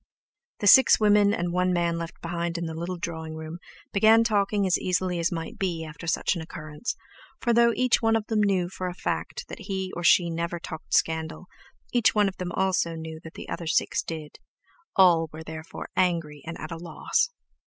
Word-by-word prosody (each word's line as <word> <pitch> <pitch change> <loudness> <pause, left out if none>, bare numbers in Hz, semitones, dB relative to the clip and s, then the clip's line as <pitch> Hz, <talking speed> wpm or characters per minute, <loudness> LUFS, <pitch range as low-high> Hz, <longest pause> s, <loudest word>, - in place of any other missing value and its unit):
The - - -1
six 260 +5 +8
women 210 -1 +5
and 175 -3 -1
one 180 0 +2
man 170 -1 0
left 165 0 -7
behind 170 0 -2
in 170 - -3
the 160 - -4
little 170 +3 -4
drawing 160 -2 -5
room 160 +2 -7 0.3
began 220 +3 +6
talking 205 -2 +1
as 185 - +2
easily 180 -1 0
as 170 +2 +1
might 165 -2 -5
be 170 -4 -2
after 155 +2 -9
such 165 - +1
an 170 - -4
occurrence, 155 +5 -6 0.4
for 235 - +1
though 235 0 +5
each 255 -1 +2
one 225 -1 +3
of 220 -2 0
them 215 -1 +1
knew 190 -4 +2
for 185 0 -5
a 180 - -5
fact - - -3
that - - -8
he 190 -2 -3
or 175 - -4
she 170 0 +5
never 170 +1 -3
talked 160 -1 -4
scandal, 160 +1 0 0.5
each 240 -3 +3
one 210 -1 +4
of 190 - -5
them 180 -1 -4
also 185 -3 +1
knew 160 0 -7
that 160 - -11
the - - -8
other 170 - -5
six 155 - +1
did; 155 -2 -7 0.6
all 170 -4 +5
were 160 +1 -8
therefore 160 0 -8
angry 165 -5 0
and 170 - -5
at 155 - -7
a 165 - -4
loss. 170 - 0
175 Hz, 205 wpm, -26 LUFS, 165-195 Hz, 0.6 s, six